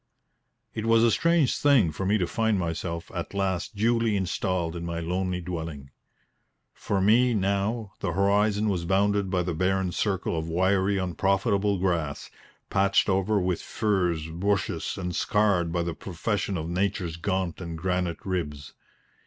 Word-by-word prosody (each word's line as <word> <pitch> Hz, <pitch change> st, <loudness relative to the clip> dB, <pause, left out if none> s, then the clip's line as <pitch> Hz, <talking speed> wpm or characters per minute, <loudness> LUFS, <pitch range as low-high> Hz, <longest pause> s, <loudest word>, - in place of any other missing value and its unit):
It 110 Hz, 0 st, -3 dB
was 115 Hz, 0 st, +5 dB
a 115 Hz, -, +5 dB
strange 170 Hz, 0 st, +3 dB
thing 130 Hz, -, +4 dB
for 95 Hz, +5 st, -3 dB
me 105 Hz, +2 st, +3 dB
to 90 Hz, -, 0 dB
find 110 Hz, +3 st, 0 dB
myself 85 Hz, 0 st, -3 dB
at 90 Hz, +2 st, -5 dB
last 95 Hz, 0 st, -1 dB
duly 115 Hz, +1 st, +2 dB
installed 90 Hz, -2 st, -1 dB
in 85 Hz, -, -5 dB
my 85 Hz, 0 st, -3 dB
lonely 90 Hz, +2 st, -2 dB
dwelling. 80 Hz, -6 st, -6 dB, 0.8 s
For 100 Hz, -, -2 dB
me, 115 Hz, +5 st, +4 dB
now, 100 Hz, +2 st, -1 dB
the 85 Hz, -, -2 dB
horizon 100 Hz, +3 st, +2 dB
was 90 Hz, -4 st, -1 dB
bounded 100 Hz, +1 st, +2 dB
by 90 Hz, -2 st, +1 dB
the 85 Hz, 0 st, -2 dB
barren 95 Hz, +2 st, 0 dB
circle 95 Hz, -2 st, -1 dB
of 80 Hz, 0 st, -3 dB
wiry, 95 Hz, +3 st, +2 dB
unprofitable 95 Hz, +2 st, +1 dB
grass, 85 Hz, -6 st, -2 dB, 0.4 s
patched 100 Hz, +1 st, +3 dB
over 95 Hz, +2 st, +2 dB
with 90 Hz, -2 st, -1 dB
furze 90 Hz, -7 st, 0 dB
bushes 100 Hz, +4 st, -1 dB
and 90 Hz, -1 st, -3 dB
scarred 100 Hz, -5 st, +2 dB
by 85 Hz, 0 st, 0 dB
the 85 Hz, 0 st, -3 dB
profusion 95 Hz, +3 st, -2 dB
of 80 Hz, 0 st, -4 dB
Nature's 90 Hz, -1 st, -1 dB
gaunt 95 Hz, 0 st, -2 dB
and 85 Hz, -2 st, -5 dB
granite 90 Hz, 0 st, -2 dB
ribs. 75 Hz, -7 st, -4 dB
95 Hz, 155 wpm, -26 LUFS, 85-100 Hz, 0.8 s, was